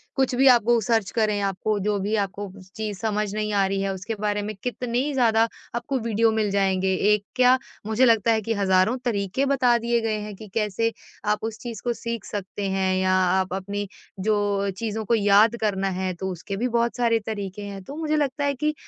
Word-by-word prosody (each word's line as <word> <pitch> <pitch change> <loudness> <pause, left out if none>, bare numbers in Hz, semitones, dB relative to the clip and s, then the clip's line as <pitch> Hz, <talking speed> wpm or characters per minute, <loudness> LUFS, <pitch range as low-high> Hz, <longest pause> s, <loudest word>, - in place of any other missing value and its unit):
कुछ 265 -1 +1
भी 270 +2 +4
आप 245 -2 +7
वो 240 0 +4
सर्च 220 -2 +1
करें 215 -3 +1
आपको 200 +2 -1
जो 205 +1 0
भी 205 +3 -1
आपको 200 +1 -4 0.3
चीज़ 215 -3 -4
समझ 210 -2 -1
नहीं 210 0 -1
आ 200 -1 +3
रही 195 0 -1
है, 195 - -1
उसके 190 +4 -5
बारे 210 -1 0
में 210 0 -5
कितनी 250 +3 -1
ज़्यादा 230 -3 +3 0.3
आपको 245 +3 -2
वीडियो 225 0 +2
मिल 220 -1 0
जाएँगे। 190 -1 +1 0.2
एक 210 -1 0
क्या, 255 0 +5 0.3
मुझे 220 +4 +3
लगता 230 -2 +4
है 220 -1 +2
कि 225 +2 -1
हज़ारों 195 +3 +2
तरीके 205 +3 0
बता 255 -3 +3
दिए 235 0 +1
गए 220 -1 -1
हैं 210 -1 -7
कि 215 - -11
कैसे 225 +1 0 0.3
आप 210 +1 0
उस 225 0 -3
चीज़ 235 -3 -7
को 240 - 0
सीख 235 -2 -5
सकते 200 0 -4
हैं 190 -1 +1
या 185 0 +2
आप 185 0 +2
अपनी 200 +2 -3 0.3
जो 205 -1 +1
चीज़ों 220 -1 -3
को 230 - +3
याद 210 +2 +5
करना 195 -3 0
है 185 -1 -1
तो 190 +2 -4
उसके 180 +3 -6
भी 240 +5 0
बहुत 235 -1 0
सारे 230 -2 +2
तरीके 205 -2 -5
हैं। 200 -1 -7
तो 280 +10 -8
मुझे 310 -1 0
लगता 285 0 -1
है 285 - +1
कि 300 +3 -1
215 Hz, 215 wpm, -24 LUFS, 200-235 Hz, 0.3 s, आप